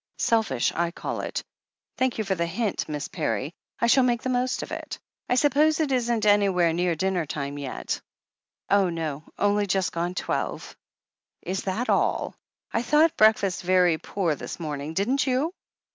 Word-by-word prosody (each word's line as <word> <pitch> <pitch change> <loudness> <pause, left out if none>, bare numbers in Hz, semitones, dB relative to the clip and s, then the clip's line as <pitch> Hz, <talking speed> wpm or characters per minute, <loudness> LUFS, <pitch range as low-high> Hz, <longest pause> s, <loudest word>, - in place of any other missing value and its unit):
Selfish 215 - +1
I 170 0 0
call 170 - -4
it. - - -4 0.6
Thank 260 -1 +1
you 220 - 0
for 195 -2 0
the 170 -2 -1
hint, 195 +2 -2
Miss 150 -1 -3
Parry. 130 +9 -2 0.3
I - - +2
shall 255 +3 +5
make 240 -2 +1
the 260 - -1
most 250 +1 0
of - - -9
it. - - -5 0.3
I 250 - +3
suppose 300 +3 +3
it 305 -3 +1
isn't 235 -3 +1
anywhere 195 -5 +4
near 175 0 +1
dinner 180 -1 0
time 140 -1 -4
yet?" 135 -3 -4 0.7
'Oh, 195 -2 +3
no! 155 -3 -3
Only 205 0 +2
just 190 0 +1
gone 175 +2 -2
twelve." - - -3 0.7
Is 190 +1 -3
that 210 +6 -1
all? - - +1 0.4
I 230 - +1
thought 300 +6 +4
the - - -39
breakfast 200 -3 +3
very 180 -3 +3
poor 180 -6 -1
this 145 - -7
morning, 150 -1 -4
didn't 255 +9 +1
you?" 270 +7 +1
195 Hz, 175 wpm, -26 LUFS, 170-240 Hz, 0.7 s, shall